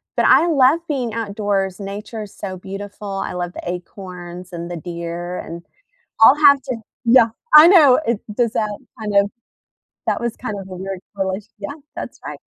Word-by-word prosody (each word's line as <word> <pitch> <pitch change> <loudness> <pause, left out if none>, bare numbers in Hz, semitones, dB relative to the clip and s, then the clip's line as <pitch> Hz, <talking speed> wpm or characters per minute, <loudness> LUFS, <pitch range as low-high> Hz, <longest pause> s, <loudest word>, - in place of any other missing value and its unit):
but - - +2
I 340 - +6
love 285 0 +4
being 250 -7 -2
outdoors, 200 -3 -2
nature 205 +2 -6
is 205 - -12
so 190 -2 -6
beautiful. 200 +2 -8
I 195 0 -3
love 175 0 -4
the - - -7
acorns 180 0 -9
and 170 0 -6
the 175 - -5
deer 170 +1 -5
and 170 +1 -8 0.6
I'll 260 +6 +8
have 280 -2 +7
to 255 -4 -4 0.3
yeah. 230 -1 +6 0.3
I 305 +2 +11
know, 310 -8 +7
it 235 -2 0 0.2
does 235 -3 +1
that 210 -1 -1 0.2
kind 210 -2 -4
of 200 0 +4 0.8
that - - 0
was 235 -1 -3
kind 215 -5 -5
of 190 - -10
a 185 - -8
weird 190 0 -6 0.2
push. 190 +1 -2
Yeah, 205 +8 -6 0.2
that's - - -7
right. - - -6
200 Hz, 180 wpm, -20 LUFS, 185-235 Hz, 0.8 s, I